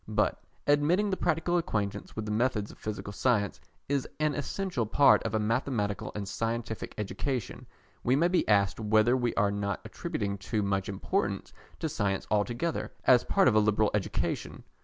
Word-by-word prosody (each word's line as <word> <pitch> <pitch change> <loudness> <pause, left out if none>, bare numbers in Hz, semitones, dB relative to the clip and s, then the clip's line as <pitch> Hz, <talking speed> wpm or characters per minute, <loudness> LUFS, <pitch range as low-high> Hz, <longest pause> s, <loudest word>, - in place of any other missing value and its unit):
But - - 0 0.2
admitting 165 +8 +3
that 190 - -1
a - - -17
practical 175 +1 +2
acquaintance 105 -9 -3
with 110 - -3
the 105 - -3
methods 110 -2 0
of - - -16
Physical 100 -1 -5
Science 105 -3 +1 0.3
is 140 -1 -1
an 155 -1 +2
essential 145 - -2
part 140 +6 +5
of 110 -1 -2
a - - +2
mathematical 110 -2 -1
and 100 -2 -4
scientific 115 +2 -3
education, 120 +3 -3 0.4
we 125 - +3
may 165 +5 +4
be 180 0 +1
asked 100 -1 +3
whether 110 +3 +3
we 120 -2 0
are 105 -3 +2
not 100 -1 -2
attributing 100 -1 -3
too 105 +2 -1
much 100 -1 -1
importance 100 - -2 0.3
to 160 - 0
science 100 -9 -1
altogether 120 +10 0
as 125 -2 +6
part - - +3
of 125 - +5
a 110 - +5
liberal 105 0 +2
education. 105 -2 -2
110 Hz, 175 wpm, -29 LUFS, 105-135 Hz, 0.4 s, as